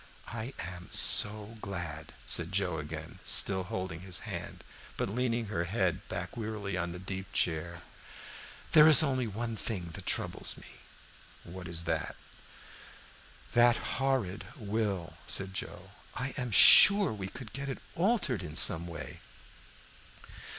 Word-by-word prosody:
"I 115 +3 -6
am 90 0 -8
so 105 +2 +1
glad," 85 -5 -6
said 85 +1 +2
Joe 95 -4 -1
again, 80 +1 -8
still 95 -2 +3
holding 90 -2 -5
his 90 -1 -5
hand, - - -7 0.3
but - - -2
leaning 120 0 -1
her 85 -5 -3
head 95 -1 -1
back 90 0 -5
wearily 105 -4 -4
in 85 -1 -3
the 90 - -7
deep 95 +1 -7
chair. 85 +1 -1 0.9
"There 155 -1 +8
is 155 0 +9
only 130 -4 0
one 115 +2 -4
thing 95 -7 -4
that - - -10
troubles - - -1
me." - - -12 0.8
"What 90 0 -9
is 85 0 -4
that?" 85 - -3 1.4
"That 120 0 +5 0.3
horrid 125 -8 -1
will," 100 -5 -3
said 95 -1 -1
Joe. - - -7 0.2
"I 135 - -3
am 125 -1 -2
sure 200 - +8
we 100 -3 -6
could 110 +2 -10
get 140 0 -5
it 135 - -4 0.2
altered 175 - 0
in 75 -4 -8
some 85 -1 +3
way." 85 -1 -8
95 Hz, 140 wpm, -30 LUFS, 85-115 Hz, 1.4 s, is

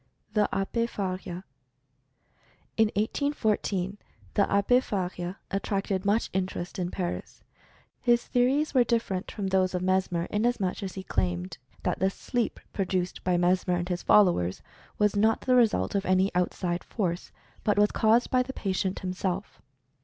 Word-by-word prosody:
THE 210 -1 +3
ABBE 230 +4 0
FARIA. 185 -3 -4 1.3
In 220 -1 +4
1814, 210 -5 0 0.3
the 200 - +2
Abbe 200 +5 +4
Faria 180 -5 -3
attracted 195 -1 -1
much 210 +3 +1
interest 185 0 -3
in 175 -1 -1
Paris. 180 -1 -5 0.6
His 240 -1 +3
theories 265 +5 +2
were 255 -3 +6
different 225 -6 -1
from 200 -3 -3
those 185 -1 +2
of 180 - -1
Mes 185 0 +1
mer, 170 -1 -1
inasmuch 210 -4 0
as 190 -3 -5
he 190 - -5
claimed 90 - -2 0.2
that - - -1
the 190 - +3
"sleep" 235 +3 -2
pro 195 - 0
duced 180 -1 -2
by 180 -1 +2
Mesmer 180 +1 +2
and 175 +1 -2
his 180 -1 -1
followers 170 - +3 0.3
was 210 -1 +2
not 220 +2 +3
the 255 - +2
re 240 -2 +7
sult 95 - -2
of 200 -2 -1
any 185 +1 +3
outside 180 0 -1
force, 180 -5 -3 0.3
but 210 - +2
was 210 0 +4
caused 225 +2 +3
by 255 - +4
the 260 +1 -4
pa 200 - -4
tient 190 0 -1
himself. 185 +1 -3
195 Hz, 160 wpm, -28 LUFS, 180-215 Hz, 1.3 s, re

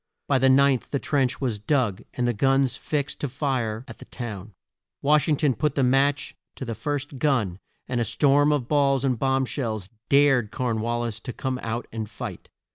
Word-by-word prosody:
By 135 - +3
the 130 +1 +4
ninth 135 -1 +4
the 140 - 0
trench 135 -2 0
was 120 -6 -2
dug 115 -4 0
and 125 -1 0
the 120 - +1
guns 135 +2 +2
fixed 145 -1 -3
to 145 - -1
fire 125 -4 -2
at - - -11
the - - -11
town. 105 -4 -7 0.5
Wash 150 +3 +3
ing 150 - +3
ton 145 -3 +2
put 150 +2 -1
the 140 - +2
match 135 +3 +2 0.2
to 130 - -6
the 115 - -3
first 145 +1 -4
gun, 115 -12 +1 0.3
and 125 -1 -1
a - - +3
storm 145 +4 +3
of 140 -5 0
balls 140 -2 +2
and 125 -4 0
bomb 135 0 +2
shells 110 -8 -3 0.2
dared 135 -6 +4
Corn 115 -2 -2
wal 120 +1 -1
lis 115 -2 -3
to 125 - -7
come 130 +1 -3
out 115 +1 -3
and 110 -2 -5
fight. 110 - -7
130 Hz, 200 wpm, -25 LUFS, 115-140 Hz, 0.5 s, the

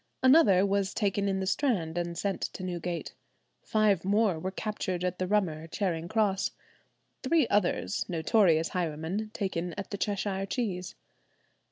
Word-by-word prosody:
Another 245 - +6
was 200 0 0
taken 200 -1 0
in 190 0 0
the - - -1
Strand 190 - 0
and 175 -1 -3
sent 200 -1 -2
to 185 - -7
Newgate. 175 -1 -4 0.5
Five 215 -2 +2
more 200 -3 +2
were 185 - -3
captured 190 -3 -3
at 180 0 -2
the 185 - -1
Rummer, 175 -6 0
Charing 170 -2 -2
Cross; 205 -2 +1 0.7
three 290 -1 +3
others, 205 +1 +1
notorious 165 -1 +3
highwaymen, 175 +4 -2
taken 180 -4 -2
at 200 - -6
the 200 - -4
"Cheshire 195 -1 -1
Cheeze." 185 -6 -3
190 Hz, 145 wpm, -29 LUFS, 175-210 Hz, 0.7 s, Another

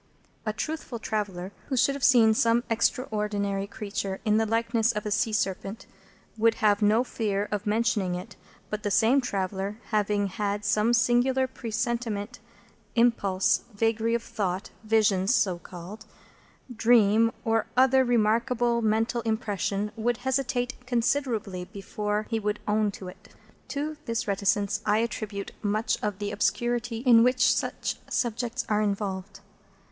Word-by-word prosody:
A - - +2
truthful 305 +1 -4
traveller, 200 -5 -3 0.2
who 265 - -2
should 275 +3 +3
have 280 -2 -6
seen 230 -4 +6
some 230 +2 +2
extraordinary 210 -4 0
creature 200 -2 -4
in 215 0 +3
the 220 0 +1
likeness 230 +1 +1
of 210 - -4
a 210 - -2
sea 220 +2 +1
serpent, 195 0 -2 0.5
would 225 +1 +4
have 210 -1 +2
no 215 +3 +4
fear 210 -5 -2
of 210 0 -3
mentioning 210 -4 +1
it; 180 +2 -8 0.4
but 210 0 -3
the 205 - -1
same 225 +7 +4
traveller, 195 -2 -3
having 210 -1 +1
had 205 +1 -2
some 210 +2 +2
singular 250 +2 +3
presentiment, 235 -2 -3 0.6
impulse, 215 -6 +3 0.2
vagary 225 +1 +1
of 235 - -2
thought, 200 -5 -3
vision 215 -3 +2
(so 190 -6 +2
called), 185 +6 -10 0.7
dream, 225 -1 +4
or 225 -1 +1
other 260 +1 +5
remarkable 235 0 +2
mental 225 +2 +1
impression, 210 -2 -2
would 235 +1 0
hesitate 260 -1 0
considerably 235 -7 -1
before 210 +2 -3
he 225 - +1
would 210 0 -2
own 210 0 +2
to 195 -2 -8
it. 190 +4 -13 0.3
To 290 +3 -3
this 230 -3 -2
reticence 200 0 0
I 210 0 +2
attribute 215 -3 -3
much 215 +1 0
of 210 -2 -2
the 205 0 -3
obscurity 240 +2 -1
in 240 -3 +6
which 250 -1 +4
such - - -2
subjects 240 +1 -1
are 210 0 +1
involved. 200 -1 -3
220 Hz, 140 wpm, -27 LUFS, 205-235 Hz, 0.7 s, seen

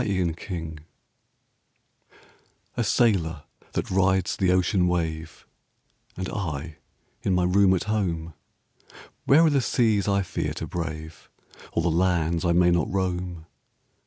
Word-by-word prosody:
THE - - -2
SAILOR 85 -3 -2 2.0
A 120 - 0
sailor 95 - +1 0.3
that - - -2
rides 95 0 +2
the 95 -2 +2
ocean 90 0 +2
wave, 80 -2 -3 0.7
Am 95 - -3
I 80 -5 -4 0.4
in 95 - +1
my 90 - +2
room 95 +1 +4
at 90 - -1
home: 85 -7 -2 0.9
Where 160 +5 +6
are 160 - +4
the 140 -2 +3
seas 110 -4 +1
I 100 -1 +2
iear 95 - -3
to - - -4
brave. 80 -2 -6 0.4
Or 85 - 0
the 85 - +2
lands 85 -1 +1
I 85 - +3
may 90 +1 +4
not 85 -2 +1
roam? 90 -3 -2
90 Hz, 130 wpm, -25 LUFS, 85-100 Hz, 2.0 s, Where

